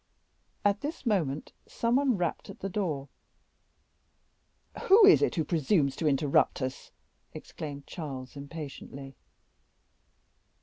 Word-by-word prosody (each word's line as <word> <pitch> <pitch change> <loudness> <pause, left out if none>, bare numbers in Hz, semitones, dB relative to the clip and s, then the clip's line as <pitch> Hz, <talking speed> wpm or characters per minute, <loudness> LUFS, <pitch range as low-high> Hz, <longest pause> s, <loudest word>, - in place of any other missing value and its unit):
At 205 0 +2
this 300 0 -5
moment 160 - 0 0.2
some 235 +1 0
one 270 -5 +2
rapped 175 -3 -2
at - - -11
the 195 - -3
door. 160 -9 -2 1.8
"Who 405 +2 +8
is 395 - +7
it - - +1
who 165 - +1
presumes 155 -3 +1
to 160 - 0
interrupt 140 0 +2
us?" 130 -1 -5 0.4
exclaimed 145 -2 -8
Charles, 135 -6 -7
impatiently. 140 -2 -8
155 Hz, 115 wpm, -29 LUFS, 140-205 Hz, 1.8 s, Who